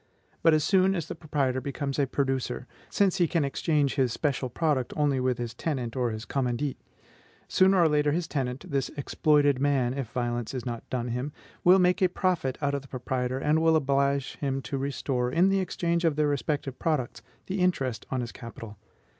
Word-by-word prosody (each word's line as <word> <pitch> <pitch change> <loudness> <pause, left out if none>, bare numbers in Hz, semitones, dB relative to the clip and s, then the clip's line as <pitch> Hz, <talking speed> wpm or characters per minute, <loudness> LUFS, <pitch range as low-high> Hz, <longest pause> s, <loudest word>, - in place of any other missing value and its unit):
But 165 -1 +5
as 155 - +1
soon 190 +1 +3
as 170 - -3
the - - -4
proprietor 140 -5 -1
becomes 140 0 -3
a 140 - +2
producer, 135 -2 -1 0.2
since 195 -2 +2
he 175 -3 +3
can 160 -2 +1
exchange 145 0 +1
his 130 -4 +1
special 135 -1 -1
product 145 -2 0
only 145 -3 +2
with 125 -1 0
his 120 -2 -4
tenant 125 -3 -3
or 125 -2 +1
his 110 0 -5
commandite, 130 +2 -1 0.7
sooner 190 +1 +4
or 170 - +6
later 150 -1 +2
this 165 +2 -1
tenant, 130 -3 -3
this 135 -2 0
exploited 145 -1 +2
man, 135 -3 +2
if 135 -3 -3
violence 120 0 -2
is 125 - -4
not 120 -2 -5
done 125 -2 -2
him, 125 +5 -3 0.3
will 180 +2 +7
make 180 0 +3
a 185 - +4
profit 175 -8 0
out 140 0 +1
of 140 - -1
the 135 - -15
proprietor, 130 0 -2
and 150 +4 +2
will 160 0 +4
oblige 140 -2 +1
him 135 -2 -1
to 135 +3 -3
restore 135 -2 -1
in 175 +7 +4
the 195 0 +2
exchange 170 -2 -1
of 165 -3 +2
their 150 0 +2
respective 140 -1 -2
products 150 -7 -1 0.2
the 190 +1 -3
interest 135 -10 0
on 130 -1 -1
his 120 -1 -5
capital. 115 -4 -10
140 Hz, 195 wpm, -27 LUFS, 125-155 Hz, 0.7 s, will